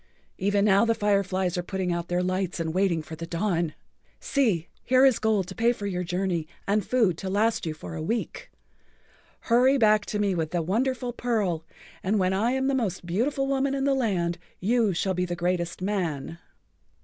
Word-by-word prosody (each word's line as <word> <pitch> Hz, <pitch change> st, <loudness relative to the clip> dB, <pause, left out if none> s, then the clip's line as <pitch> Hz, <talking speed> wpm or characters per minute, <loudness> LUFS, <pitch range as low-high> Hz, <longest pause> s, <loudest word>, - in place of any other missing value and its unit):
Even 200 Hz, +1 st, +2 dB
now 200 Hz, 0 st, +5 dB
the 230 Hz, 0 st, +2 dB
fireflies 190 Hz, -4 st, +1 dB
are -, -, 0 dB
putting 180 Hz, 0 st, -2 dB
out 170 Hz, 0 st, -3 dB
their 180 Hz, 0 st, 0 dB
lights 185 Hz, -1 st, -1 dB
and 160 Hz, -1 st, -2 dB
waiting 180 Hz, -4 st, +1 dB
for 160 Hz, -, -8 dB
the 165 Hz, +1 st, -7 dB
dawn. 170 Hz, -2 st, -1 dB, 0.4 s
See, 215 Hz, -, +1 dB, 0.2 s
here 255 Hz, +1 st, +5 dB
is 265 Hz, -4 st, +4 dB
gold 215 Hz, -3 st, +1 dB
to -, -, -6 dB
pay 230 Hz, +4 st, +2 dB
for 205 Hz, -, -7 dB
your 180 Hz, -2 st, -2 dB
journey 180 Hz, -2 st, -1 dB, 0.2 s
and 205 Hz, +1 st, +2 dB
food 210 Hz, -7 st, +1 dB
to 190 Hz, -, -4 dB
last 210 Hz, -1 st, +1 dB
you 155 Hz, -, -3 dB
for 155 Hz, -, -8 dB
a 160 Hz, -, -5 dB
week. 225 Hz, +9 st, -3 dB, 0.9 s
Hurry 255 Hz, +3 st, +4 dB
back 215 Hz, -3 st, +3 dB
to 210 Hz, -, -2 dB
me 205 Hz, -2 st, +1 dB
with 160 Hz, -3 st, -1 dB
the 175 Hz, -1 st, -1 dB
wonderful 245 Hz, +6 st, -1 dB
pearl, 205 Hz, -10 st, -1 dB, 0.4 s
and 200 Hz, +4 st, +1 dB
when 185 Hz, -1 st, +2 dB
I 210 Hz, +5 st, +1 dB
am 265 Hz, 0 st, 0 dB
the[Pg 265 Hz, -1 st, +1 dB
64] -, -, +1 dB
most 180 Hz, -4 st, -4 dB
beautiful 245 Hz, +10 st, 0 dB
woman 275 Hz, 0 st, 0 dB
in 270 Hz, -, -1 dB
the 275 Hz, 0 st, +3 dB
land 185 Hz, -10 st, 0 dB, 0.2 s
you 225 Hz, +1 st, +2 dB
shall 190 Hz, +2 st, 0 dB
be 180 Hz, 0 st, 0 dB
the 175 Hz, -1 st, -3 dB
greatest 175 Hz, 0 st, -2 dB
man." 170 Hz, -6 st, -2 dB
195 Hz, 200 wpm, -26 LUFS, 175-230 Hz, 0.9 s, now